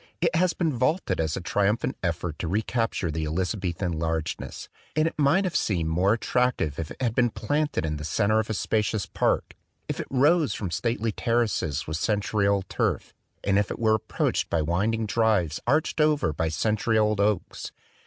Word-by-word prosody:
It - - +1
has 180 +1 +3
been 165 -4 0
vaunted 130 +9 0
as 80 -2 -1
a - - -4
triumphant 105 +5 0
effort 85 -2 -2
to 85 - -2
recapture 110 -2 -1
the 80 +1 -2
Eliza 90 +6 -1
bethan 90 -2 -2
largeness; 80 -1 -3 0.3
and 155 +1 +3
it 165 - -3
might 150 +6 +3
have 185 -3 -2
seemed 85 -6 0
more 90 +5 +3
attractive 115 - 0
if 80 -2 -4
it - - -10
had 120 -4 0
been 120 0 +3
planted 145 - -1
in 75 -1 -2
the 75 - -6
center 105 +7 +2
of 110 - -2
a 110 - -1
spacious 105 +1 0
park, - - 0 0.3
if - - -3
it - - -4
rose 145 - +3
from 95 -5 -4
stately 115 +5 -1
terraces 110 - 0
with 80 0 -3
century 105 +1 0
old 100 -1 +1
turf, - - -1 0.3
and 100 0 +3
if 105 - 0
it - - -4
were 110 -2 +3
approached 110 - -1
by 80 -2 +1
winding 105 +8 0
drives 105 -7 +1
arched 155 +3 +2
over 150 - +2
by 80 +2 -1
century 110 +7 +1
old 105 -1 +2
oaks. 100 -2 -1
105 Hz, 190 wpm, -26 LUFS, 85-120 Hz, 0.3 s, has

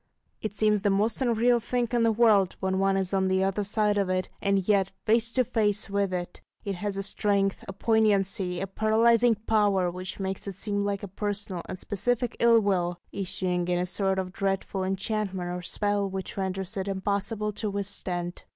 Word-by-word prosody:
It 215 - -3
seems 210 -1 +2
the 205 - +2
most 210 +5 +1
unreal 240 0 +3
thing 240 +1 -1
in 240 -1 +2
the 230 0 +4
world, 215 -4 +4
when 190 0 0
one 195 0 +2
is 190 0 -2
on 190 -1 +2
the 190 0 +2
other 195 +2 0
side 210 0 +1
of 195 -2 0
it; 185 0 -1
and 195 -2 +1
yet 195 -2 +3
face 230 +1 +2
to 255 - +3
face 210 -3 0
with 200 -1 +1
it, 175 -1 -4 0.2
it 200 - -1
has 195 +2 -3
a 195 - -1
strength, 200 -1 0
a 195 - -5
poignancy, 195 -4 +1
a 195 - -1
paralysing 225 +3 +3
power, 200 -5 +2
which 185 +2 -7
makes 190 +1 -3
it 195 - -5
seem 205 +1 -2
like 200 0 -2
a - - -4
personal 200 -2 -3
and - - -4
specific 240 +5 -1
ill 235 -1 +6
will, 180 -4 0
issuing 180 -2 -2
in 180 0 +1
a 180 - 0
sort 190 +1 0
of 185 -1 -3
dreadful 195 -1 -1
enchantment 190 -1 -2
or 180 0 -4
spell, 205 +2 -1
which 190 0 -5
renders 190 +1 -3
it 190 0 -2
impossible 200 +2 -1
to 210 +1 -3
withstand. 185 -3 -3
200 Hz, 195 wpm, -27 LUFS, 190-215 Hz, 0.2 s, ill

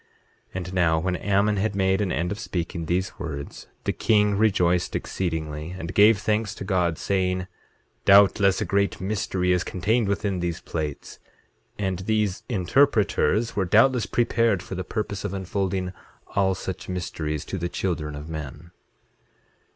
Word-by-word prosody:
8:19 - - -26
And 90 0 -4
now, 85 -3 +3
when 90 +3 -1
Ammon 100 +2 +1
had 105 +1 0
made 95 0 +2
an 95 -3 0
end 90 +2 -1
of 100 - -4
speaking 85 -2 -4
these 95 +2 -1
words 70 -3 -6 0.2
the - - 0
king 105 -2 +3
rejoiced 90 -4 +2
exceedingly, 80 -2 -3
and 85 0 -5
gave 105 +1 +6
thanks 105 0 -1
to - - -7
God, 90 -4 +1
saying: 90 0 0 0.6
Doubtless 100 -1 +5
a - - 0
great 100 -2 0
mystery 95 -2 -1
is 90 -1 +2
contained 105 +5 0
within 100 -1 -1
these 85 -2 -2
plates, 75 -3 -5 0.6
and 95 -3 -2
these 105 -1 0
interpreters 115 +1 +2
were 100 - +1
doubtless 110 +3 +4
prepared 115 -5 +1
for - - -8
the 95 0 -3
purpose 100 +1 -4
of 100 -1 -3
unfolding 95 -1 -2 0.4
all 95 -1 +2
such 95 0 -6
mysteries 80 -4 -3
to 95 - -4
the 85 +1 -2
children 80 -6 -2
of 75 +2 -8
men. 80 +1 -7
95 Hz, 155 wpm, -25 LUFS, 85-100 Hz, 0.6 s, gave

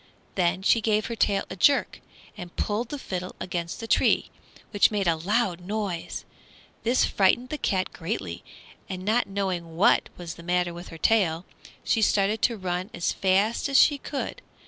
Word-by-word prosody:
Then 185 0 0
she 225 +3 +4
gave 215 -1 +1
her 235 - -4
tail 200 -3 +2
a - - -4
jerk 280 +9 +2 0.3
and 180 -4 -9
pulled 220 +3 -1
the 290 - -4
fiddle 185 -8 -5
against 170 -2 -4
the 230 - -5
tree, - - +2 0.4
which 205 - +5
made 205 -2 -1
a 165 - +4
loud 185 +2 0
noise. 195 -3 -4 0.6
This 240 +3 +3
frightened 225 +6 +2
the 300 - -4
cat 185 -5 -1
greatly, 95 - -4 0.5
and 185 0 -5
not 225 +4 +2
knowing 185 -4 -3
what 185 - +4
was 175 -2 -6
the - - -12
matter 175 0 0
with 175 +1 -9
her 165 - -9
tail, 175 -3 +2 0.4
she 225 - +1
started 210 +1 +2
to 235 - +2
run 185 0 -3
as 170 - 0
fast 200 +7 +1
as 275 - +4
she 290 0 +5
could. 280 0 -5
195 Hz, 175 wpm, -26 LUFS, 175-220 Hz, 0.6 s, which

